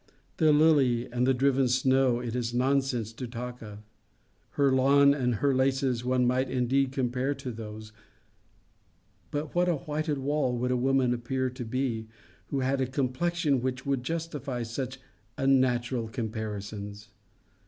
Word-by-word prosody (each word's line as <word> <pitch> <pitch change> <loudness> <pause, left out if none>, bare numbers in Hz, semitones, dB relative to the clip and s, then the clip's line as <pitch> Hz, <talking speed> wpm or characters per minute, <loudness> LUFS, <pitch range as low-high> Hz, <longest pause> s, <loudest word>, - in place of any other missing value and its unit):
The 155 -1 +4
lily 145 -6 +4
and 125 +1 +1
the 135 - +4
driven 135 0 +2
snow 130 -1 +2
it 120 -1 -4
is 120 -1 -2
nonsense 130 -3 0
to 125 +2 -6
talk 125 +1 -7
of: 105 -1 -10 0.7
her 140 -1 +4
lawn 140 +2 +5
and 125 -4 0
her 140 +6 +1
laces 130 -2 +1
one 125 0 +2
might 125 +1 +1
indeed 130 +1 +1
compare 130 +1 -1
to 135 -2 -6
those; 110 -1 -8 1.4
but 145 0 -4
what 180 0 +2
a 170 - +2
whited 150 0 -2
wall 135 -2 0
would 125 +1 -1
a - - +2
woman 130 0 +2
appear 130 +2 -2
to 125 0 -6
be, 115 -2 -2 0.4
who 135 - -2
had 135 +1 0
a 130 - +1
complexion 140 +2 0
which 130 0 -3
would 140 -2 0
justify 150 -4 -4
such 130 +3 -5 0.4
unnatural 125 -3 +2
comparisons? 105 -2 -5
130 Hz, 150 wpm, -28 LUFS, 120-135 Hz, 1.4 s, lawn